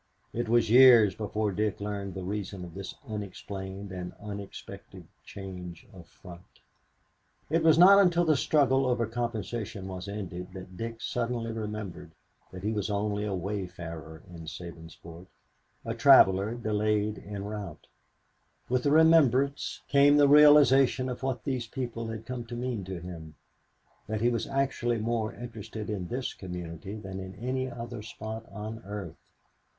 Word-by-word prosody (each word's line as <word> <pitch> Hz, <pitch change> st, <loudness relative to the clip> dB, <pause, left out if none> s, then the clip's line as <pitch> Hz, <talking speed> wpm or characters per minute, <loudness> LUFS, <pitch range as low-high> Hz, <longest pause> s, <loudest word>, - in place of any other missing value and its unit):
It 120 Hz, -1 st, -2 dB
was 115 Hz, -2 st, +3 dB
years 120 Hz, -5 st, +8 dB
before 105 Hz, +1 st, -2 dB
Dick 105 Hz, +1 st, -1 dB
learned 100 Hz, -2 st, -4 dB
the 95 Hz, -, -5 dB
reason 100 Hz, -1 st, -4 dB
of 85 Hz, -, -11 dB
this 100 Hz, 0 st, -7 dB
unexplained 100 Hz, -2 st, -6 dB
and 90 Hz, -1 st, -6 dB
unexpected 100 Hz, -1 st, -9 dB, 0.2 s
change 90 Hz, -3 st, -9 dB
of -, -, -13 dB
front. 90 Hz, 0 st, -15 dB, 0.9 s
It 165 Hz, +1 st, +3 dB
was 160 Hz, -1 st, +5 dB
not 195 Hz, +3 st, +9 dB
until 175 Hz, -3 st, +4 dB
the 155 Hz, -2 st, +4 dB
struggle 135 Hz, -2 st, +3 dB
over 120 Hz, -2 st, +1 dB
compensation 115 Hz, -3 st, -4 dB
was 95 Hz, 0 st, -6 dB
ended 95 Hz, -3 st, -6 dB
that 90 Hz, 0 st, -9 dB
Dick 115 Hz, +2 st, -6 dB
suddenly 115 Hz, -1 st, -2 dB
remembered 105 Hz, -6 st, -6 dB, 0.4 s
that 95 Hz, 0 st, -9 dB
he 105 Hz, -, 0 dB
was 105 Hz, -1 st, -2 dB
only 105 Hz, 0 st, -1 dB
a 100 Hz, -2 st, -2 dB
wayfarer 85 Hz, -4 st, -6 dB
in 85 Hz, -2 st, -10 dB
Sabinsport, 85 Hz, +1 st, -10 dB, 0.6 s
a 115 Hz, -, -2 dB
traveler 115 Hz, -4 st, +6 dB
delayed 105 Hz, -2 st, 0 dB
en 100 Hz, -1 st, -6 dB
route. 105 Hz, -6 st, -7 dB, 0.8 s
With 125 Hz, 0 st, +2 dB
the 140 Hz, -, +1 dB
remembrance 145 Hz, -4 st, +4 dB
came 145 Hz, +1 st, +5 dB
the 145 Hz, -1 st, +6 dB
realization 140 Hz, -3 st, +6 dB
of 125 Hz, -, -5 dB
what 130 Hz, -4 st, -2 dB
these 130 Hz, -4 st, -2 dB
people 120 Hz, -3 st, -4 dB
had 110 Hz, 0 st, -6 dB
come 125 Hz, -1 st, -5 dB
to 120 Hz, +1 st, -7 dB
mean 120 Hz, -4 st, -3 dB
to 95 Hz, -1 st, -5 dB
him, 80 Hz, -3 st, -9 dB, 0.7 s
that 110 Hz, 0 st, -2 dB
he 120 Hz, -, +4 dB
was 115 Hz, -2 st, -2 dB
actually 135 Hz, -3 st, 0 dB
more 110 Hz, 0 st, -1 dB
interested 110 Hz, -2 st, -7 dB
in 95 Hz, -4 st, -3 dB
this 125 Hz, +4 st, -3 dB
community 90 Hz, +1 st, -7 dB
than 95 Hz, -3 st, -7 dB
in 95 Hz, 0 st, -8 dB
any 130 Hz, +4 st, -2 dB
other 120 Hz, -1 st, -7 dB
spot 110 Hz, +1 st, -7 dB
on 110 Hz, +2 st, -6 dB
earth. 100 Hz, -4 st, -7 dB
105 Hz, 150 wpm, -29 LUFS, 95-120 Hz, 0.9 s, not